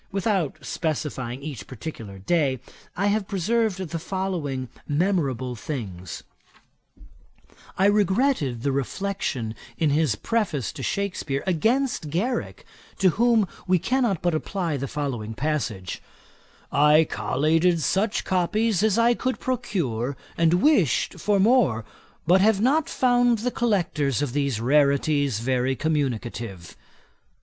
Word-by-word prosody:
Without 195 -6 0
specifying 140 -6 -3
each 135 -9 -7
particular 115 -6 -8
day, 135 - +1 0.4
I 195 - +1
have 205 -1 +1
preserved 215 +1 0
the 170 -3 -4
following 170 -8 -3 0.2
memorable 145 - 0
things. 100 - -6 1.5
I 190 - +3
regretted 200 - +2
the 140 - +1
reflection 135 - -2 0.2
in 155 -3 +2
his 150 -6 +2
Preface 185 - -1
to - - -9
Shakspeare 185 -8 -2
against 220 - +1
Garrick, 220 - -2 0.3
to 190 - +4
whom 225 +1 +3 0.2
we 185 0 +4
cannot 225 -1 0
but 175 -1 +2
apply 170 0 -2
the 140 0 -3
following 125 -7 -4
passage: 125 -10 -2 0.7
'I 150 +2 +5
collated 160 +10 +2
such 195 +7 0
copies 200 +3 +1
as 220 -1 +2
I 235 +1 +5
could 255 +2 -2
procure, 150 - -2 0.2
and 170 +2 +2
wished 215 - +2
for 205 -1 +2
more, 195 - +3 0.4
but 180 +4 +5
have 210 0 +4
not 280 +7 +2
found 245 -2 +3
the 245 +4 -2
collectors 160 - 0
of 130 -4 -3
these 140 -5 0
rarities 140 -1 +2
very 130 +1 0
communicative.' 120 - -3
160 Hz, 120 wpm, -24 LUFS, 135-200 Hz, 1.5 s, I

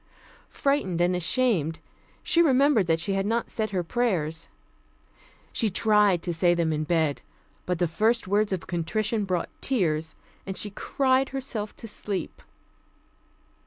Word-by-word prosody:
Frightened 275 -12 0
and 175 +1 +2
ashamed, 180 - +1 0.5
she 350 -1 +3
remembered 275 - +4
that 165 0 +2
she 180 +4 -1
had 195 +1 0
not 230 +2 -1
said 215 -1 -1
her 185 -3 -1
prayers. 165 -7 -1 1.1
She 225 - +1
tried 205 -3 +3
to 175 - -2
say 175 +1 +3
them 165 -2 0
in 155 0 -2
bed, 160 -3 0 0.5
but 180 -1 0
the 175 0 +1
first 220 +7 +1
words 205 +2 +1
of 185 -3 -3
contrition 210 +5 -1
brought 185 -2 -1
tears, 160 - 0 0.3
and 190 -1 -5
she 210 - -1
cried 265 +4 +1
herself 255 -6 -4
to 230 - -9
sleep. 205 -2 -4
195 Hz, 145 wpm, -26 LUFS, 170-230 Hz, 1.1 s, remembered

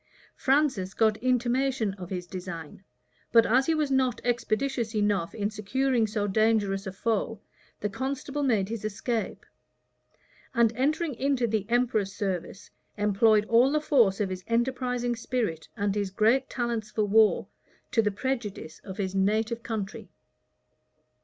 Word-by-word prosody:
Francis 265 -10 +1
got 220 -2 +3
intimation 250 -2 +1
of 185 -3 -9
his 180 -2 -4
design; 180 -2 -8 0.5
but 230 -1 +6
as 255 +4 +3
he 325 - +3
was 300 -3 0
not 255 -3 +2
expeditious 240 0 -1
enough 205 -5 0
in 205 -1 -1
securing 235 +3 0
so 210 -1 -1
dangerous 205 -1 +1
a - - -3
foe, 225 +1 -1 0.4
the 210 - 0
constable 275 +6 -3
made 220 -9 +2
his 225 0 -5
escape;[] 220 +2 -3 1.1
and 235 -2 +4
entering 295 +5 0
into 260 0 0
the 215 -3 -1
emperor's 235 -5 +1
service, 195 0 -4 0.3
employed 210 +1 +3
all 235 +5 +4
the 305 - +2
force 240 -10 +3
of 200 -3 -1
his 185 0 -5
enterprising 245 0 0
spirit, 225 -10 -2
and 205 -1 0
his 200 -1 -1
great 225 +7 +2
talents 235 -3 -2
for 215 - 0
war, 215 +1 +4 0.4
to 225 - +4
the 210 - +1
prejudice 210 -7 -4
of 190 -1 -9
his 190 -2 -2
native 215 +4 +1
country. 215 -4 -5
220 Hz, 145 wpm, -27 LUFS, 200-250 Hz, 1.1 s, but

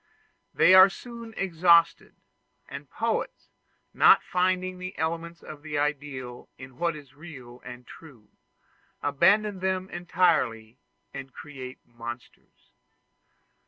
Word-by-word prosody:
They 185 - +5
are 185 +1 +9
soon 235 +1 -10
exhausted: 170 -2 +3 0.5
and - - -9
poets, - - -3 0.4
not - - +6
finding 185 0 -1
the 185 +1 -7
elements 170 +1 -4
of 150 -1 -10
the 150 -1 -5
ideal 140 -4 -4
in 130 -1 -13
what 170 -1 0
is 145 -3 -13
real 135 -6 -12
and 125 0 -10
true, 130 -10 -15 0.7
abandon 190 +8 +2
them 190 0 -2
entirely 130 -10 0 0.3
and 135 -1 -8
create 130 -3 -10
monsters. 120 +1 -11
160 Hz, 110 wpm, -26 LUFS, 130-185 Hz, 0.7 s, are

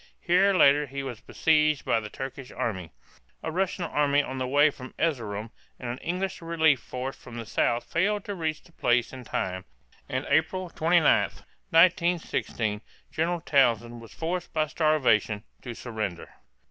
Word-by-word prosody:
Here 185 +3 +4
later 145 -3 +5
he 140 +1 -5
was 125 -5 -6
besieged 155 -2 +2
by 115 - +2
a 105 -1 -7
Turkish 135 +2 -7
army. 95 -7 -3 0.5
A 160 - -2
Russian 185 +1 -1
army 145 -3 +2
on 130 -1 -5
the 130 - -1
way 145 +3 +4
from 130 -2 -11
Erzerum 115 -9 -2 0.3
and 120 -2 -4
an 125 - -6
English 185 +2 -3
relief 160 -4 +3
force 130 +2 -5
from 120 -2 -11
the 115 - -5
south 120 +2 +1
failed 205 +4 0
to 205 - -4
reach 160 -4 -3
the - - -20
place 120 -6 +1
in 130 -1 -8
time, 95 -3 -3 0.5
and 130 +2 -2
April 175 +3 +1
29, 165 +1 +3 0.7
1916, 165 - +2 0.3
General 170 +2 -1
Townshend 120 -6 +2
was 115 - -13
forced 175 +2 -3
by 155 -1 +2
starvation 135 -10 +2 0.2
to 120 -2 -7
surrender. 110 -8 -5
140 Hz, 160 wpm, -27 LUFS, 120-165 Hz, 0.7 s, later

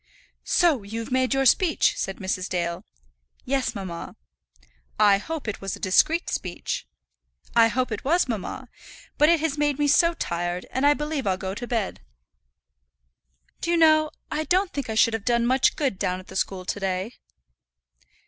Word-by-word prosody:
"So 330 -9 +3
you've 225 +4 -6
made 260 0 +1
your 270 0 +1
speech," 325 +6 +3
said 195 - -4
Mrs. 185 -1 -3
Dale. 170 -1 -2 0.6
"Yes, 270 -1 -1
mamma." 185 -4 -6 0.8
"I 205 -2 +5
hope 315 +4 -6
it 215 - -4
was 195 -1 -3
a - - -13
discreet 310 - +2
speech." 180 -2 -4 0.7
"I 230 -1 +7
hope 250 +2 -1
it 215 - -4
was, 335 +4 +2
mamma. 240 +3 -5 0.5
But 300 - +6
it 335 -2 +3
has 305 -2 -1
made 290 -2 +1
me 295 -1 +1
so 335 +4 +4
tired, 175 - -3
and 265 +2 +2
I 290 - +5
believe 295 -4 -3
I'll 185 -1 +1
go 190 0 -4
to 240 +4 -6
bed. 225 -5 -2 1.6
Do - - -4
you 345 - +3
know 310 -1 +5 0.2
I 310 - -1
don't 370 +2 +1
think 280 -5 -4
I 220 - -2
should 225 +1 +4
have 225 -2 -3
done 235 0 +2
much 255 +2 +3
good 270 -11 -1
down 180 0 -1
at 185 - -14
the 190 - -10
school 190 -1 -2
to 205 - -3
day?" 190 +3 -2
240 Hz, 175 wpm, -25 LUFS, 195-295 Hz, 1.6 s, I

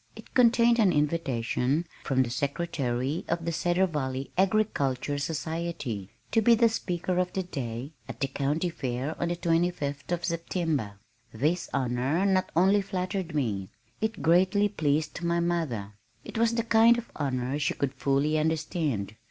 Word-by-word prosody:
It - - -13
contained 235 -1 +5
an 205 -5 +5
invitation 145 -1 0 0.2
from 130 -1 +3
the 120 - -5
Secretary 140 -1 -1
of 170 0 -1
the 170 - 0
Cedar 175 +3 +2
Valley 135 -5 -3
Agriculture 150 - +1
Society 160 - -3 0.2
to 225 - +3
be 235 +2 +6
"the 230 0 +4
Speaker 180 -4 -2
of 180 0 0
the 190 - -1
Day" 130 -5 -5 0.2
at 120 -3 -7
the 135 - +1
County 145 +6 -1
Fair 130 0 -3
on 170 - +1
the 175 - -1
twenty 170 0 +2
fifth 145 -3 -5
of 175 -1 -1
September. 165 - -1 0.4
This 155 +10 0
honor 130 +8 0
not 190 -1 +2
only 190 +4 +4
flattered 185 -3 -3
me, 100 -9 -1 0.3
it 220 -2 -2
greatly 185 +5 +4
pleased 155 -4 -1
my 170 0 +1
mother. 155 -13 -1 0.3
It - - -9
was 230 0 +3
the 230 - +1
kind 230 +1 +5
of 235 - -6
honor 130 -1 -1
she 145 - 0
could 140 -1 -1
fully 140 +3 +1
understand. 155 - -1
160 Hz, 160 wpm, -28 LUFS, 135-180 Hz, 0.4 s, be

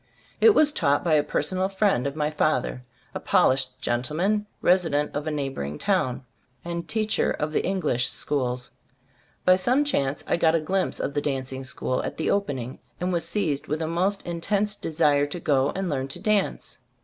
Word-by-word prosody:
It 445 -2 +6
was 300 -1 +5
taught 145 - +1
by 170 -3 +2
a 150 - +5
personal 185 +6 -1
friend 195 - +1
of 140 - -4
my 150 0 0
father, 140 -4 0 0.3
a - - -3
polished 130 -1 +2
gentleman, 160 - 0
resident 165 -5 +2
of 145 +2 -3
a - - 0
neighboring 135 - -3
town, 130 -11 0 0.4
and 170 0 -4
teacher 215 -1 0
of 155 0 -2
Eng 190 0 0
lish 125 -5 +1
schools. 125 -3 -2 0.7
By 185 - +7
some 250 +9 +3
chance 140 - -1
I - - +1
got 160 -1 +3
a - - +3
glimpse 185 +5 -1
of - - -2
the 145 - 0
dancing 135 -2 -3
school 130 0 -2
at - - -5
the 160 - 0
opening, 135 -11 -2 0.2
and 180 +1 -1
was 170 -1 0
seized 170 -6 -1
with 155 - -2
a - - -2
most 185 +5 0
intense 200 +5 -1
desire 150 -4 +2
to 160 +4 -6
go 140 -4 +2
and 190 0 -2
learn 135 -4 -2
to 135 +6 -5
dance. 210 0 -1
155 Hz, 185 wpm, -25 LUFS, 135-185 Hz, 0.7 s, By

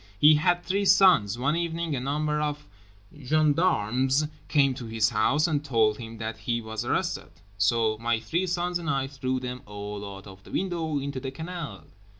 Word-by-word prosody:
He 150 +7 +7
had 175 +3 +2
three 195 +3 0
sons. 185 - +5
One 135 +5 +1
evening 170 -2 -2
a - - -2
number 150 +3 -1
of 150 0 -3 0.5
gendarmes 145 - +2 0.2
came 140 -3 +3
to 125 -2 -7
his 110 -1 +1
house 150 +2 +2
and 150 -4 0
told 110 -6 +2
him 115 -1 -8
that 110 0 -4
he 115 +2 -1
was 110 -1 -5
arrested, - - -1 0.3
"so 110 +1 +2
my 115 0 0
three 170 +10 -1
sons 175 0 -1
and 170 -1 -4
I 135 -3 +1
threw 130 -1 -3
them 125 0 -5
all 105 0 -6
out 95 - -13
of 95 -1 -13
the - - -15
window 165 -5 -2
into 140 -1 -3
the 135 +1 -4
canal." 150 - -7
135 Hz, 180 wpm, -27 LUFS, 115-160 Hz, 0.5 s, He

